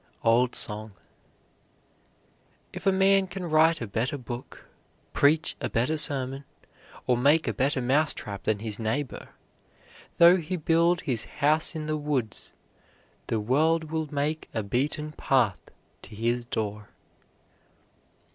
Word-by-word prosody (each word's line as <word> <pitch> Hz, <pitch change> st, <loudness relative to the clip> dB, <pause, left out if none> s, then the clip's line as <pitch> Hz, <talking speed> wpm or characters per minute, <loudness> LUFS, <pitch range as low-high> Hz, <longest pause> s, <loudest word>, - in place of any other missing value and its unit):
OLD 120 Hz, +2 st, +3 dB
SONG. 105 Hz, 0 st, 0 dB, 1.8 s
If -, -, -5 dB
a -, -, +6 dB
man 190 Hz, 0 st, +3 dB
can 190 Hz, -1 st, -6 dB
write 160 Hz, 0 st, +3 dB
a 115 Hz, -, -4 dB
better 115 Hz, +8 st, -2 dB
book, 125 Hz, -1 st, -9 dB, 0.5 s
preach 155 Hz, +3 st, +2 dB
a -, -, -2 dB
better 125 Hz, +7 st, 0 dB
sermon, 135 Hz, -2 st, -1 dB, 0.6 s
or 125 Hz, -, +2 dB
make 145 Hz, +6 st, +3 dB
a -, -, 0 dB
better 135 Hz, -1 st, 0 dB
mouse 145 Hz, +5 st, +2 dB
trap 100 Hz, -2 st, -7 dB
than 110 Hz, -1 st, +1 dB
his 110 Hz, +1 st, -5 dB
neighbor, 120 Hz, +5 st, -3 dB, 0.9 s
though 170 Hz, +2 st, +7 dB
he 180 Hz, +1 st, -4 dB
build 170 Hz, +2 st, +2 dB
his 120 Hz, -7 st, 0 dB
house 155 Hz, +3 st, +1 dB
in 155 Hz, -1 st, -4 dB
the 155 Hz, 0 st, -2 dB
woods, 140 Hz, -7 st, -3 dB, 0.8 s
the 115 Hz, -, -1 dB
world 155 Hz, +8 st, +1 dB
will 160 Hz, -2 st, -3 dB
make 150 Hz, +2 st, -2 dB
a 110 Hz, -, -1 dB
beaten 145 Hz, +8 st, -2 dB
path 125 Hz, -9 st, 0 dB, 0.3 s
to -, -, -12 dB
his 120 Hz, +2 st, -1 dB
door. 105 Hz, -3 st, -4 dB
140 Hz, 135 wpm, -26 LUFS, 115-160 Hz, 1.8 s, though